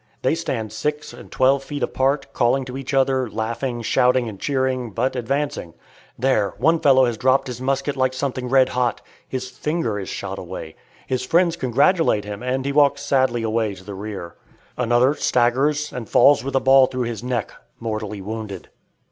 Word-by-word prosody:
They - - +2
stand 115 -10 -3
six 150 +6 -3
and - - -13
twelve 135 +1 +3
feet 145 0 -5
apart, 140 +1 0
calling 130 +2 +1
to 125 0 -7
each 135 -1 -5
other, 130 -2 +2
laughing, 115 +3 -3
shouting 125 +2 +2
and 100 -3 -8
cheering, 130 -2 -1
but 130 +6 -1
advancing. 130 - -2 0.4
There: 110 -7 +1
one 160 +5 +3
fellow 130 -3 +5
has 120 -3 -2
dropped 130 +1 +3
his 125 -2 -7
musket 135 +2 -1
like 130 -1 0
something 130 -2 -3
red 130 0 +4
hot. 125 -1 -1 0.3
His 130 -1 -5
finger 130 -5 -2
is 95 - -6
shot - - -5
away. 80 - -8 0.3
His 130 -1 -2
friends 170 +5 +2
congratulate 140 - +2
him, 105 0 -6
and 130 +1 -2
he 140 - 0
walks 140 0 +3
sadly 130 -4 +1
away 110 -2 -1
to 95 - -14
the 100 +1 -8
rear. 95 -4 -7 0.4
Another 125 +2 +3
staggers 140 +4 +1
and 125 -3 -6
falls 140 -4 +5
with 135 0 -4
a - - +5
ball 135 0 +6
through 125 -1 -3
his 115 -2 -4
neck, 125 -3 -2 0.3
mortally 110 -3 -4
wounded. 105 -2 -6
130 Hz, 180 wpm, -22 LUFS, 115-135 Hz, 0.4 s, ball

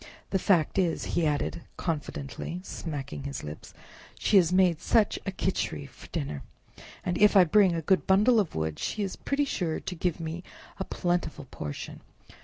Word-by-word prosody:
"The 190 - +2
fact 175 -1 +3
is," 175 -3 +1
he 165 -2 +2
added 145 -1 -1 0.2
confidentially, 160 +1 -4
smacking 145 -7 -5
his 140 0 -5
lips, 75 +1 -8 0.5
"she 205 - +4
has 175 -3 +5
made 180 -3 +4
such 220 -3 +3
a - - 0
Khichri 75 - -2
for - - -14
dinner! 70 0 -4 0.6
and 180 - -1
if 210 0 +6
I 190 - +9
bring 190 +3 +5
in - - -1
a 165 - -3
good 190 +4 +2
bundle 215 +5 +5
of 195 -6 -1
wood 80 -1 -2
she 210 - -2
is 195 - -3
pretty 285 +1 0
sure 175 - -1
to - - -5
give 175 0 -1
me 165 +1 -4 0.4
a - - 0
plentiful 175 -5 -1
portion. 75 -1 -6
175 Hz, 180 wpm, -28 LUFS, 145-190 Hz, 0.6 s, I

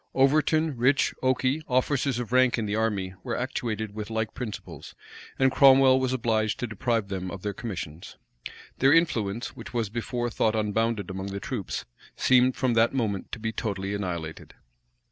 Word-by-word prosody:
Overton, 150 +2 +3
Rich, 130 +4 +3
Okey, 130 +3 +1
officers 130 0 +1
of 120 -1 -4
rank 130 -1 +4
in 115 - -1
the 105 0 -1
army, 105 -4 -1
were 120 -3 -3
actuated 110 -4 -3
with 105 0 -6
like 110 -1 -2
principles, 120 -5 -7 0.4
and 135 0 +3
Cromwell 135 -1 +6
was 130 -1 0
obliged 110 -4 0
to - - -1
deprive 115 -1 -1
them 95 -1 -4
of 95 0 -8
their 105 -1 -2
commissions. 95 - -7 0.6
Their 135 +2 +5
influence, 120 -10 +1
which - - -10
was 115 -4 0
before 120 +1 -3
thought 110 0 +1
unbounded 110 -2 0
among 95 +1 -5
the 100 0 -4
troops, 105 -3 -4 0.3
seemed 130 0 +4
from 130 -3 +1
that 115 +3 +3
moment 105 -7 -2
to - - -4
be 110 0 -2
totally 100 -3 -3
annihilated. 85 -6 -5
115 Hz, 165 wpm, -26 LUFS, 105-130 Hz, 0.6 s, Cromwell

